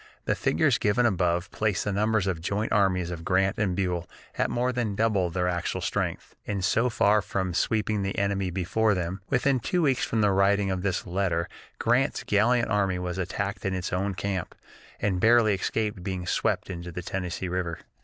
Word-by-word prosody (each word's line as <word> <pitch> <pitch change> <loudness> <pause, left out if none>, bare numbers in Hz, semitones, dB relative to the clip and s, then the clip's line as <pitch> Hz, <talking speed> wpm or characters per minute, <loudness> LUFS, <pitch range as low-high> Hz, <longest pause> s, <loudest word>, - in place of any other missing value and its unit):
The - - +2
figures - - +2
given 110 +4 +2
above 90 -4 +1
place 105 -4 0
the 105 - -1
numbers 105 0 +1
of 95 -3 0
the - - -12
joint 100 +5 -2
armies 90 -3 +2
of 85 -1 -6
Grant 95 +2 +1
and 95 -4 +1
Buell 90 -3 -2 0.3
at - - 0
more 125 +1 0
than 115 -5 -1
double 100 -5 +1
their 90 +1 -1
actual 85 -1 -1
strength. - - -3
And 100 -3 -1
so 115 +7 +2
far 105 -2 +3
from 95 -3 -2
sweeping 105 +3 0
the 95 0 -3
enemy 100 -1 0
before 100 +4 +1
them, 90 +2 -3
within 135 0 +2
two 175 +9 0
weeks 135 -4 +2
from 115 - 0
the 105 -1 +4
writing 100 0 +3
of 95 -1 -2
this 95 -2 -1
letter 90 -2 0 0.3
Grant's 125 +5 +1
gallant 115 +4 +2
army 100 -3 +1
was 90 0 -4
attacked 100 +3 -3
in 95 -2 -1
its 90 -1 -3
own 95 +1 -1
camp, 95 -2 -3 0.4
and 95 -3 0
barely 115 -2 +5
escaped 105 +1 -2
being 90 -1 -4
swept 90 - 0
into 85 0 -6
the 90 +1 -6
Tennessee 90 0 -3
River. 90 -2 -2
95 Hz, 195 wpm, -27 LUFS, 90-105 Hz, 0.4 s, barely